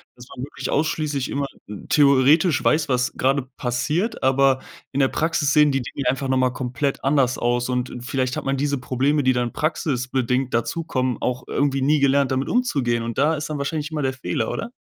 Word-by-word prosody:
dass 120 0 -13
man 125 - -6
wirklich 140 - -6
ausschließlich 150 -3 -1
immer 140 0 -1 0.2
n 105 -1 -9
theoretisch 145 +3 +4
weiß, 150 -1 +2
was 125 -1 +1
gerade 135 +1 +1
passiert, 150 - -1
aber 135 0 +3 0.3
in 140 - -2
der 135 - +4
Praxis 155 -1 0
sehen 150 -1 +5
die 135 -1 0
Dinge 125 +2 -4
einfach 135 +1 -1
noch 130 0 +1
mal 130 0 +3
komplett 130 +2 -3
anders 135 -2 +2
aus 120 +1 0
und, 125 0 -1
äh, 125 - -8
vielleicht 130 0 -2
hat - - -3
man 135 0 0
diese 140 +1 0
Probleme, 135 +4 0
die 130 0 +3
dann 120 -1 -1
praxisbedingt 130 -4 -1
dazukommen, 130 -1 -1
auch 125 0 -2
irgendwie 135 -1 0
nie 145 +2 +3
gelernt 140 -1 +3
damit 130 +1 -1
umzugehen 140 - 0
und 115 -1 -5
da 150 +4 +3
ist 150 +1 -5
dann 150 - -3
wahrscheinlich 150 +2 -3
immer 155 -1 -2
der 135 -1 0
Fehler, 130 - -2
oder? 230 - -4
135 Hz, 200 wpm, -22 LUFS, 125-145 Hz, 0.3 s, sehen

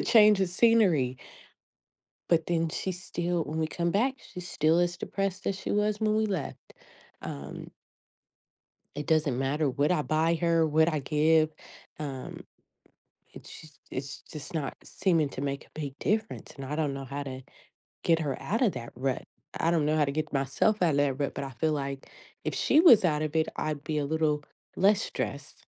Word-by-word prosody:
change 210 -3 +6
of 190 - +2
scenery." 180 - +3 1.1
But 165 -2 +3
then, 165 -1 +1
she's 185 +3 -4
still 175 -2 -1
when 155 +2 -4
we 160 - +1
come 170 +1 -1
back, 250 +8 +2
she's 180 -1 -9
still 160 +3 +2
as 175 0 +1
depressed 195 0 -3
as 195 -1 -2
she - - -3
was 210 +1 +1
when 215 -1 +2
we 220 0 +2
left. 185 -8 -5 0.5
Um 70 0 -7 1.2
It 150 - -4
doesn't 155 -5 +2
matter 140 +2 +1
what 145 +5 +1
I 150 - +1
buy 160 +3 +2
her, 165 -1 +2
what 160 +2 +3
I 155 - 0
give. 155 +2 +3 0.5
Um, 135 -4 -6 0.9
it's - - -11
just 155 -3 -16
it's 135 +1 -6
just 150 +1 -9
not 150 -4 -2
seeming 165 -6 +1
to 135 - -6
make 140 0 -3
a - - -26
big 140 -2 -5
difference, 220 +1 -2
and 135 -1 -7
I 150 - -3
don't 150 -3 0
know 135 0 -6
how 140 +2 -4
to 130 -1 -7 0.6
get 165 -1 +3
her 140 -4 -1
outta 225 0 +1
that 120 - -7
rut. 130 0 -1 0.3
I 165 - +2
don't 160 -3 +2
know 155 +1 +2
how 150 - +4
to 140 - -2
get 155 0 -3
myself 140 +9 +1
out 170 - +4
of 140 - 0
that 140 -1 +1
rut, 140 - -1
but - - -3
I 135 - -6
feel 155 +5 0
like, 140 -2 -4 0.3
if - - -2
she 310 - +4
was 240 - +8
out 155 -3 +2
of 155 0 -3
it, 160 0 +2
I'd 150 -2 -3
be 155 -1 -1
a 145 - 0
little 155 -1 +1 0.3
less 200 +2 +4
stressed. 140 +1 -4
155 Hz, 190 wpm, -28 LUFS, 140-180 Hz, 1.2 s, was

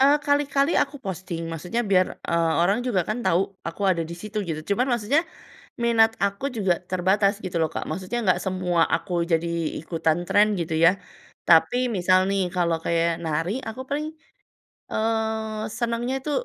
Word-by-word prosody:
Eee, 280 +2 +6
kali-kali 285 +1 +2
aku 285 - -5
posting 180 -3 -5
maksudnya 180 +9 -2
biar, 185 -3 +3 0.2
eee, 165 -1 +1
orang 200 +6 +2
juga 190 -8 +1
kan 215 +3 -2
tahu 180 -6 +2 0.3
aku 170 +4 -7
ada 170 -2 +1
di - - -5
situ 210 +4 -4
gitu, 155 -1 -3
cuman 245 +5 +1
maksudnya 240 +6 +2 0.6
minat 225 -1 +4
aku 200 +4 -1
juga 190 -5 +1
terbatas 195 +3 +2
gitu 180 -2 -4
loh 160 - +2
Kak. - - -4
Maksudnya 185 +8 -3
enggak 185 -3 +3
semua 180 -3 +1
aku 165 +2 -3 0.2
jadi 165 +1 +2 0.3
ikutan 165 +1 -1
tren 205 +1 +5
gitu 160 -1 -2
ya, 165 +1 +6 0.6
tapi 170 +8 +5 0.2
misal 185 0 +4
nih 195 -1 +1
kalau 170 -2 +1
kayak 170 0 +1
nari 160 +3 -1 0.2
aku 225 +3 -6
paling, 295 +2 -2 0.9
eee, 220 -1 -1 0.2
senengnya 235 +2 -1
itu 300 - -4
190 Hz, 165 wpm, -24 LUFS, 170-225 Hz, 0.9 s, Eee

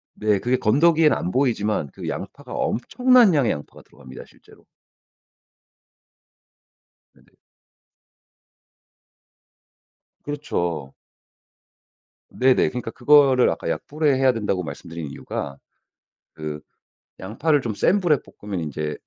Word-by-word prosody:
네. 105 -2 +1
그게 125 +5 0
건더기에는 155 +7 +3
안 90 - -3
보이지만 110 - 0
그 - - -8
양파가 - - -7
엄청난 245 - +3
양의 140 -6 +2
양파가 70 - -8
들어갑니다 - - -13
실제로. - - -22 2.5
네네. - - -25 3.0
그렇죠. 85 - -3 1.4
네네. 130 0 +3
그러니까 125 -2 -5
그거를 135 0 +4
아까 - - -3
약불에 150 -2 0
해야 130 0 +3
된다고 105 -5 -2
말씀드린 80 +2 -7
이유가 70 0 -6 0.8
그 75 -1 -6 0.6
양파를 140 +10 0
좀 115 -4 -4
센 195 - +2
불에 170 -6 +2
볶으면 100 -3 -7
인제 75 -1 -4
120 Hz, 240 characters per minute, -22 LUFS, 85-145 Hz, 3.0 s, 그거를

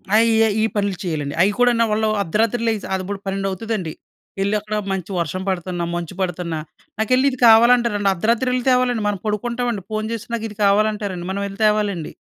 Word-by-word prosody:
ఆ! - - +7
ఈ - - +3 0.3
ఈ - - +2
పనులు 200 -3 0
చేయాలండి. 150 -4 -3
అవి 195 - +4
కూడానూ 240 -2 +4
వాళ్ళు 215 0 +1
అర్ధరాత్రి 220 +6 0
లెగిసి 220 -2 -1
అప్పుడు 190 +1 -4
12 195 0 -2
అవుతదండి. 190 -4 -3 0.5
ఎళ్ళి 200 +2 0
అక్కడ 215 +1 -5 0.2
మంచి 190 0 -4
వర్షం 185 +2 -2
పడుతున్న, 180 -1 -3
మంచు 175 0 -4
పడుతున్నా, 175 -3 -2 0.4
నాకెళ్ళి 255 +5 +3
ఇది 255 - -7
కావాలంటారండి. 230 -3 +5
అర్ధరాత్రి 230 +7 0
వెళ్లి 250 0 0
తేవాలండి! 250 -3 +2
మనం 205 -2 -1
పడుకుంటామండి. 235 0 -2
ఫోన్ 215 0 -2
చేసి 230 - -6
నాకు 225 - -4
ఇది 210 - -13
కావాలంటారండి. 205 -3 +1
మనం 200 +1 -2
ఎళ్లి 195 +1 -10
తేవాలండి. 205 -6 0
205 Hz, 175 wpm, -20 LUFS, 190-225 Hz, 0.5 s, ఆ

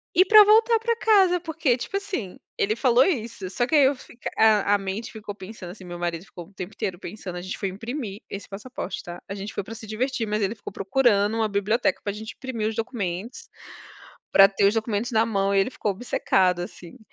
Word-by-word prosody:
E 370 - +6
pra 425 +2 +9
voltar 445 +2 +5
para 465 +1 0
casa 385 -6 +4
porque, 320 -7 0
tipo 325 - -6
assim, 380 - -5 0.2
ele 210 +2 +1
falou 250 +1 +4
isso, 230 - -2
só 240 +6 0
que 285 - 0
aí 290 -3 +7
eu 270 - +4
f 250 - -16 0.2
a 210 -2 +4
a - - +2
mente 195 +3 -5
ficou 210 -2 -7
pensando 190 -2 -9
assim 190 -1 -12
marido 175 0 -4
ficou 175 -3 -10
o 200 - -25
tempo 185 +2 -7
inteiro 180 -2 -4
pensando, 185 -2 -7
a - - -5
gente 185 +1 -5
foi 195 - -2
imprimir 220 +1 -6
esse 200 - -7
passaporte, 205 0 -6
tá? 175 +1 -8
A 200 - -5
gente 200 +1 -6
foi - - -3
pra 220 - -9
se 220 0 -10
divertir 230 +2 -2
mas 210 +1 -1
ele 200 +2 0
ficou 205 - -9
procurando 205 0 +2
uma 220 -1 +2
biblioteca 205 +1 0
pra 205 - -1
gente 220 +3 -7
imprimir 240 -5 -3
os 220 - -3
documentos. 225 -1 -4 0.9
Pra 195 - +9
ter 200 0 0
os 200 - +3
documentos 220 0 -1
na 225 0 +3
mão 200 -3 0
e - - +4
ele 195 - 0
ficou 215 - -2
obcecado 185 -4 +1
assim. 175 +3 -9
215 Hz, 220 wpm, -25 LUFS, 195-250 Hz, 0.9 s, pra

